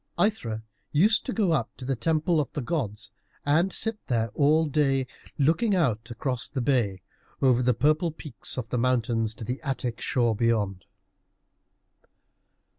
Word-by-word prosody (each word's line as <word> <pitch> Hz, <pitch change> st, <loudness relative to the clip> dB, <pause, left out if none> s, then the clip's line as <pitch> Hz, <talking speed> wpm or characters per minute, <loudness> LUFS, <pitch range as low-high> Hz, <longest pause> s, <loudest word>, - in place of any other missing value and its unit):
Aithra 115 Hz, -, 0 dB, 0.3 s
used 205 Hz, +10 st, +3 dB
to -, -, -1 dB
go 210 Hz, -7 st, +1 dB
up 135 Hz, -8 st, +1 dB
to 125 Hz, -, -8 dB
the 135 Hz, +1 st, 0 dB
temple 160 Hz, +6 st, +1 dB
of 145 Hz, -, -5 dB
the 145 Hz, -, -2 dB
gods, 115 Hz, -8 st, -3 dB, 0.3 s
and 165 Hz, +6 st, +3 dB
sit 225 Hz, +2 st, -2 dB
there 115 Hz, -2 st, +1 dB
all 155 Hz, +3 st, +4 dB
day, 135 Hz, -3 st, +1 dB, 0.3 s
looking 170 Hz, -, +3 dB
out 120 Hz, -, 0 dB
across 125 Hz, +1 st, -3 dB
the 140 Hz, -, -3 dB
bay, 120 Hz, -8 st, +1 dB, 0.4 s
over 125 Hz, -2 st, +4 dB
the 125 Hz, -1 st, +2 dB
purple 155 Hz, +7 st, +2 dB
peaks 150 Hz, -8 st, -6 dB
of 120 Hz, -3 st, -4 dB
the 125 Hz, -, -1 dB
mountains 115 Hz, -3 st, +1 dB
to -, -, -7 dB
the 125 Hz, +4 st, -4 dB
Attic 130 Hz, -5 st, -3 dB
shore 120 Hz, -3 st, +1 dB
beyond. 105 Hz, -5 st, 0 dB
130 Hz, 155 wpm, -27 LUFS, 115-155 Hz, 0.4 s, all